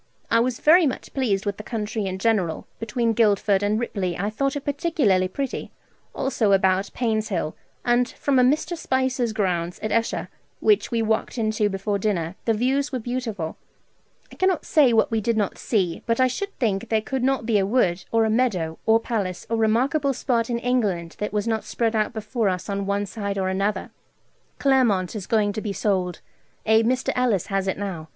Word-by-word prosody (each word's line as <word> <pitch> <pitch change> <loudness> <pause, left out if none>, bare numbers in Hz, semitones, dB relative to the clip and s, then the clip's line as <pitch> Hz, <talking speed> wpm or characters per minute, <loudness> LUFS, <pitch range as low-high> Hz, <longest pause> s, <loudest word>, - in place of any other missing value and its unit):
I 230 - +5
was 240 0 0
very 330 +1 +6
much 260 - -5
pleased 215 -7 0
with 205 -1 -2
the 215 - -7
country 210 -2 -3
in 185 0 -3
general. 190 -6 0
Between 230 +1 0
Guildford 205 -3 +3
and 205 +2 +1
Ripley 190 -7 -2
I 205 +3 -2
thought 275 +5 -1
it 285 - -5
particularly 280 - +1
pretty, 270 +8 -4 0.4
also 220 -6 +1
about 190 0 +2
Painshill; 215 -9 -1 0.3
and 240 +1 +3
from 275 -2 +1
a - - +5
Mr. 310 +6 +1
Spicer's 260 -5 0
grounds 180 -4 -1
at 215 - -2
Esher, 230 0 0 0.3
which 420 -2 +3
we 230 -2 0
walked 220 +3 -1
into 215 -2 +1
before 200 +1 -2
dinner, 185 -4 -1
the 225 - +3
views 270 +6 0
were 260 - -1
beautiful. 230 -8 -4 0.7
I - - -13
cannot 375 -3 +1
say 285 -6 +4
what 225 0 +3
we 225 -1 +1
did 230 +1 0
not 205 -3 -1
see, 185 -7 0
but 230 +1 +1
I 255 - +6
should 395 +11 -3
think 205 -6 -1
there 220 - +3
could 265 +1 -2
not 265 -3 +1
be 220 -3 +3
a 195 - +1
wood, 190 -6 +1
or 225 -1 +3
a - - +1
meadow, 190 -10 0
or 225 0 +5
palace, 200 -6 -3
or 230 - +2
remarkable 260 +6 +2
spot 235 -2 0
in 235 - 0
England 210 -9 -1
that 210 - -2
was 210 +1 -1
not 220 -1 0
spread 230 -1 -1
out 215 -1 +1
before 220 -1 -1
us 180 +2 -3
on 200 0 -2
one 200 0 0
side 200 -1 -4
or 190 -1 0
other. 195 +2 -1 0.7
Claremont 235 -9 +2
is 200 -4 -5
going 210 -2 +2
to 215 - -4
be 210 -2 -3
sold: 185 -4 -1 0.4
a 220 +1 +5
Mr. 255 +3 +1
Ellis 240 -8 +1
has 195 0 0
it 190 - -1
now. 185 -6 -5
220 Hz, 195 wpm, -24 LUFS, 195-250 Hz, 0.7 s, very